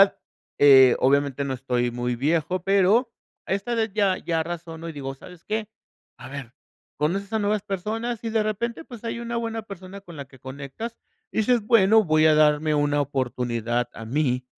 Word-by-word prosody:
edad, 195 0 +5 0.4
eh, 135 -3 +8
obviamente 140 +1 +2
no 135 -1 -2
estoy 125 -1 -1
muy 120 0 -2
viejo, 160 +6 0
pero 200 +6 +3 0.4
a - - -2
esta 200 +5 -3
edad 225 -2 0
ya 200 -3 +2
ya 165 -1 -1
razono 165 0 -7
y - - -5
digo: 135 -2 -5
"¿Sabes 175 +5 -14
qué?" 215 0 -2 0.5
A - - -10
ver, 135 -3 -8 0.5
conoces 195 +7 -1
a 220 - +1
nuevas 210 -1 0
personas 215 +4 -3
y 225 - -2
de 220 -1 +2
repente, 230 +7 -3
pues, 240 -5 -11
hay 230 0 -3
una 235 0 -4
buena 230 -1 -3
persona 195 -1 -10
con 175 -4 -12
la 140 -1 -7
que 130 0 -18
conectas 140 - -7 0.3
y - - -3
dices: 235 +1 +3
"Bueno, 220 0 +5
voy 155 -2 +4
a 155 - +6
darme 150 0 +3
una 145 0 +2
oportunidad 120 -3 -1
a 115 - -9
mí 125 0 0
165 Hz, 190 wpm, -24 LUFS, 140-215 Hz, 0.5 s, eh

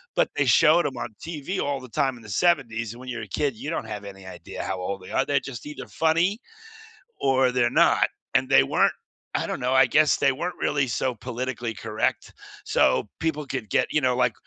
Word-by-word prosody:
but - - +2
they - - +2
showed 165 +2 +5
'em 135 -3 -3
on 115 -3 -6
TV 165 +3 -4
all 140 -1 -1
the 130 -2 -11
time 135 -1 0
in 115 - -15
the 105 - -12
‘70s, 115 - +1
and 120 - -13
when 130 0 -9
you're 120 -3 -4
a - - -8
kid, 140 +6 -1
you 145 - -6
don't 155 -8 -3
have 105 -1 -6
any 95 -1 -10
idea 95 - -8
how 95 -1 -3
old 95 +1 -4
they 95 - -11
are, - - +1
they're 145 - +2
just 135 -2 -8
either 150 - -8
funny 170 +6 +1 0.8
or 130 -1 +3
they're 125 -1 +2
not - - +4 0.3
and - - +3
they 70 - +6
weren't. - - +2 0.4
I - - -2
don't - - -3
know, 125 +1 0
I 130 0 +6
guess 155 0 +4
they 140 -1 +3
weren't 175 +7 -4
really 140 -2 +1
so 120 +3 -1
politically 125 -1 -4
correct 110 -1 -2 0.3
so 105 - +2
people 150 -2 -1
could 130 -6 -5
get - - +2
you 150 - +3
know, 125 -1 +2
like, 125 -2 +2
130 Hz, 225 wpm, -25 LUFS, 115-145 Hz, 0.8 s, they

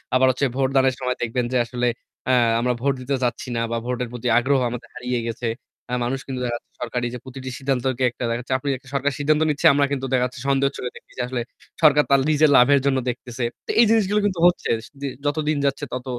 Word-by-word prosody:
আবার 130 +1 +5
হচ্ছে 130 +2 0
ভোটদানের 135 -1 +2
সময় 125 -1 -2
দেখবেন 120 +1 -1
যে 125 - +3
আসলে 120 +1 -1 0.4
আ - - +4 0.3
আমরা 125 +1 +1
ভোট 140 +1 +2
দিতে 135 +2 -1
যাচ্ছি 125 +1 -2
না 115 - 0
বা 115 - 0
ভোটের 125 -1 -2
প্রতি 125 0 -4
আগ্রহ 135 +3 +3 0.4
হারিয়ে 125 0 -2
গেছে। 115 +1 -3 0.6
মানুষ 130 +3 -1
কিন্তু 130 -2 -4
দেখাচ্ছে 120 -1 -4
সরকারি 120 0 -2
যে 125 - -5
প্রতিটি 130 0 -8
সিদ্ধান্তকে 130 -1 0 0.3
দেখাচ্ছে। 120 +2 -4 0.4
সরকার 140 +1 +1
সিদ্ধান্ত 150 +1 +2
নিচ্ছে 150 -1 +3
আমরা 145 0 +3
কিন্তু 135 -2 -2
দেখাচ্ছি 125 0 0
সন্দেহের 140 0 +2
চোখে 125 - -4
দেখতেছি। - - -9
আসলে 125 -1 -2 0.4
সরকার 150 -1 +6
তার 140 -1 +5
নিজের 155 0 +4
লাভের 140 +3 +6
জন্য 135 -1 +2
দেখতেছে। 120 0 -5 0.2
তো - - 0
এই 235 - +8
জিনিসগুলো 210 -2 +3
কিন্তু 190 -4 -1
হচ্ছে। 175 - 0 0.6
যতদিন 150 +1 0
যাচ্ছে 140 +1 0
তত 125 0 -4
130 Hz, 190 wpm, -22 LUFS, 125-140 Hz, 0.6 s, এই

